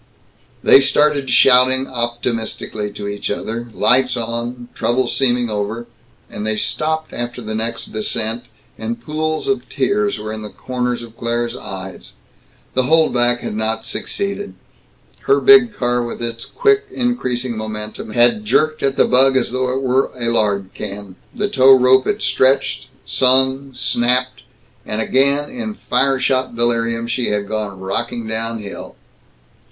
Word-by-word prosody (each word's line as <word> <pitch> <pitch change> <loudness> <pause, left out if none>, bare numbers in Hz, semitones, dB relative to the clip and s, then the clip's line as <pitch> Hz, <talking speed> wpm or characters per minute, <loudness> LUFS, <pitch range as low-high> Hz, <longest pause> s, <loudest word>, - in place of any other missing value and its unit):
They 135 - +7
started, 145 -1 +2
shouting 130 0 +5
optimistically 120 -4 -3
to 100 0 -6
each 100 0 -4
other, 115 +3 -4
lights 125 +3 +3
on, 120 +1 -4
trouble 125 +2 0
seeming 125 -1 +1
over 105 +3 -3 0.4
and 105 - -7
they 110 0 0
stopped 155 +8 -2
after 120 +1 -4
the 110 -2 -5
next 115 +2 -4
descent, 110 +2 -1 0.3
and 115 +1 -4
pools 155 +5 -3
of 205 +3 -1
tears 205 - 0
were 110 +1 -6
in 110 - -6
the 105 - -7
corners 125 +1 -3
of 115 -1 -12
Claire's 120 0 -2
eyes. 95 0 -9 0.6
The 130 - +2
holdback 125 -6 +3
had - - -4
not 110 +1 -2
succeeded. 200 - -4 0.7
Her 415 - +4
big 405 - +6
car, 125 -9 -1
with 120 - -6
its 115 -1 -5
quick 420 -3 +2
increasing 130 - -2
momentum, 110 0 -6
had 120 - +3
jerked 155 -7 +1
at 135 0 0
the - - +5
bug 130 +1 +4
as 125 - 0
though 130 0 -1
it 135 +1 -2
were 130 +1 +2
a 115 -1 0
lard 100 -4 0
can. 100 -1 -8 0.2
The 205 - -1
tow 135 -7 +6
rope 130 +1 +4
had 210 +1 -1
stretched, 130 0 +1 0.2
sung, 130 +1 +2
snapped, 125 +1 0 0.4
and 105 - -4
again, 140 +5 +1
in 235 -4 -5
fire 135 -3 +1
shot 130 -1 0
delirium, 115 0 0
she 120 +1 -1
had 105 -1 -1
gone 105 -3 -4
rocking 115 +5 -3
down 115 +1 -2
hill. 100 -1 -9
120 Hz, 150 wpm, -18 LUFS, 115-135 Hz, 0.7 s, They